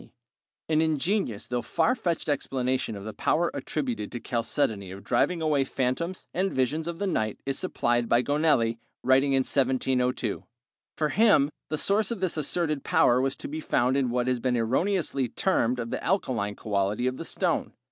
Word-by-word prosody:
] - - -68
An 155 0 +4
ingenious 160 - 0
though 125 -1 -2
far 170 - +1
fetched 175 -11 -2
explanation 130 -5 -1
of 100 - -8
the 110 +1 -6
power 170 +2 +1
attributed 130 -6 -3
to 120 - -5
chalcedony 115 -4 -1
of 95 +2 -9
driving 175 -2 +1
away 150 -3 +2
phantoms 135 +8 -2
and 190 +2 0
visions 150 +5 0
of 170 -1 -4
the 200 - -2
night 110 - -1
is 135 0 -1
supplied 120 -9 0
by 120 +1 +4
Gonelli, 145 -6 +2 0.2
writing 135 +2 +4
in 135 - +4
1702. 130 -3 0 0.5
For 155 -1 +1
him 195 -10 +4 0.2
the 155 - -1
source 200 +5 +2
of 235 - -3
this 185 -2 -1
asserted 155 -1 -1
power 125 +1 +4
was 135 0 0
to - - -7
be 155 +2 -5
found 130 -4 +1
in 135 -3 +1
what 120 0 0
has 125 -1 0
been 125 0 0
erroneously 135 - 0
termed 125 - +1
the 115 -1 -4
alkaline 120 - 0
quality 105 +3 -1
of 130 0 -1
the - - -6
stone. - - -1
135 Hz, 180 wpm, -27 LUFS, 120-160 Hz, 0.5 s, An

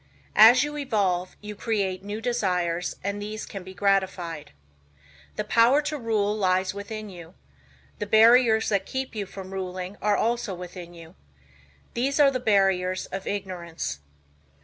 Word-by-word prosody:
As 235 +5 +8
you 295 0 -4
evolve, 195 -9 -1
you 210 0 -7
create 195 -4 -2
new 205 +2 -5
desires 180 -7 -1
and 200 +1 -3
these 215 +1 -5
can 195 -3 -8
be 190 +1 -11
gratified. 190 -5 0 0.9
The - - -2
power 235 +5 +4
to 300 +1 -3
rule 215 -3 0
lies 185 -2 +1
within 215 +2 -6
you. 175 -1 -12 0.6
The 210 - -3
barriers 225 +1 +5
that 200 -2 0
keep 265 -1 -4
you 205 -3 -4
from 190 0 -9
ruling 185 0 -5
are 210 -1 +2
also 230 -4 -1
within 175 -1 -9
you. 165 -1 -13 0.8
These 270 +5 0
are 280 -2 +6
the 255 - -2
barriers 195 -4 +2
of 195 - -5
ignorance. 170 - -4
200 Hz, 150 wpm, -25 LUFS, 185-225 Hz, 0.9 s, As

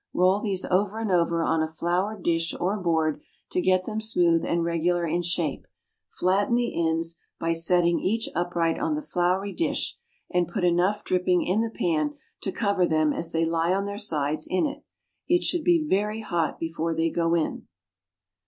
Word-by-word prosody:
Roll 185 +2 +4
these 195 -4 -1
over 200 +3 +1
and 225 -3 -2
over 170 -1 +2
on 160 0 +1
a 160 - 0
floured 180 +5 -2
dish 165 -1 0
or 185 +4 0
board 160 -4 0 0.3
to 180 - +1
get 185 0 +2
them 220 0 -3
smooth 175 -6 +2
and 170 0 0
regular 170 +1 0
in 170 +2 0
shape; 170 -4 -2 0.4
flatten 195 +6 +1
the 240 0 0 0.2
ends 165 +1 -1 0.2
by 165 0 0
setting 170 +1 +2
each 225 +4 0
upright 170 -1 0
on 310 0 0
the 300 - -3
floury 185 0 0
dish, 335 - -1 0.3
and 180 -2 +1
put 200 +1 -3
enough 180 +4 +2
dripping 180 -1 +1
in 195 +5 +1
the 230 - -1
pan 155 -8 -1 0.3
to 195 - -2
cover 200 -5 +1
them 155 -1 +2
as 165 - -3
they 165 0 +1
lie 165 +2 +1
on 200 +1 -1
their 200 0 -5
sides 155 -5 -1
in 185 - +1
it. 290 0 -5 0.4
It 350 0 +3
should 350 -3 0
be 335 -2 +3
very 210 -1 0
hot 170 -6 -1
before 165 0 -2
they 165 0 +1
go 170 0 +1
in. 165 -2 -2
175 Hz, 185 wpm, -26 LUFS, 165-200 Hz, 0.4 s, Roll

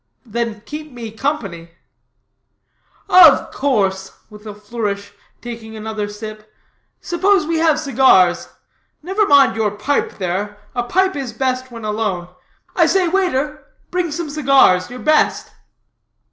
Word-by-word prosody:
"Then 230 -1 -4
keep 300 +5 -8
me 235 -3 -8
company." 200 - -4 1.3
"Of 340 -6 +6
course," 195 -8 -1 0.2
with 210 +1 -13
a 210 - -7
flourish, 205 -2 -5 0.3
taking 230 -2 -8
another 215 -1 -4
sip 215 0 -9 0.5
"suppose 380 -1 +1
we 325 0 -1
have 320 -2 +3
cigars. 260 - +3 0.6
Never 390 +4 0
mind 280 -4 +5
your 220 -1 +1
pipe 210 +8 -2
there; 200 +2 -3 0.2
a 245 - -1
pipe 375 +10 0
is 265 -5 -5
best 255 +1 -2
when 230 -2 -9
alone. 210 -5 -2 0.5
I - - +4
say, 380 -2 +2
waiter, 300 -5 -1 0.3
bring 360 -3 -1
some 310 -1 -4
cigars 270 -11 +3
your 250 - -8
best." 305 0 +1
240 Hz, 130 wpm, -18 LUFS, 210-300 Hz, 1.3 s, Of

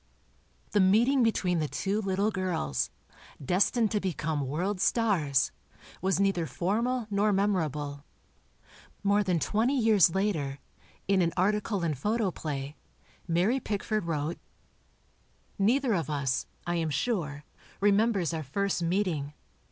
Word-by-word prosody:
The 205 - +2
meeting 230 +8 +4
between 185 -7 +1
the 155 - 0
two 200 +7 -1
little 195 +2 0
girls, 180 - -1 0.5
destined 200 - +2
to 210 - +1
become 160 -6 -2
world 180 +7 -2
stars, 170 - +2 0.5
was 190 +1 +1
neither 195 -4 +1
formal 225 - -1
nor 205 +1 +2
memorable. 155 -8 -1 1.0
More 200 +1 +3
than 180 -4 +1
twenty 230 - +1
years 215 -8 +4
later, 160 -9 -1 0.5
in 195 -1 +3
an 170 -1 +1
article 205 0 +1
in 165 -2 +1
Photoplay, 155 - -2 0.5
Mary 180 +10 +2
Pickford 215 -3 -2
wrote: 160 0 -2 1.2
Neither 240 +4 +3
of 165 -5 -1
us, 140 -4 -1 0.2
I 175 0 -1
am 165 -1 0
sure, 150 - -2 0.4
remembers 205 -3 +2
our 160 - -2
first 190 +7 -1
meeting. 165 -5 -1
185 Hz, 120 wpm, -29 LUFS, 155-210 Hz, 1.2 s, meeting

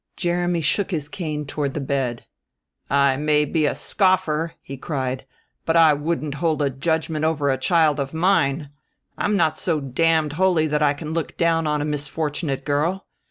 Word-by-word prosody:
Jeremy 175 -1 0
shook 185 +6 +1
his 155 -6 -3
cane 150 -2 -4
toward 140 -1 -3
the - - -1
bed. 135 -4 -2 0.6
"I 140 -1 +3
may 150 0 +2
be 155 +1 +1
a - - -1
scoffer," 175 -5 +1
he 135 - -7
cried, 130 -2 -4 0.4
"but 165 - 0
I 160 -2 +7
wouldn't 150 0 -2
hold 160 -3 +1
a 140 - +1
judgment 155 +3 -1
over 150 -3 +1
a 130 - 0
child 160 -4 +3
of 135 -1 -2
mine! 160 -4 +1 0.4
I'm 205 0 0
not 155 -5 +1
so 165 -4 0
damned 155 +3 +1
holy 175 -1 +2
that 150 -1 0
I 145 -1 +3
can 155 +1 -6
look 165 -1 -3
down 165 -1 +2
on 150 -1 0
a - - -2
misfortunate 150 0 -3
girl. 160 +7 0
155 Hz, 175 wpm, -22 LUFS, 145-165 Hz, 0.6 s, I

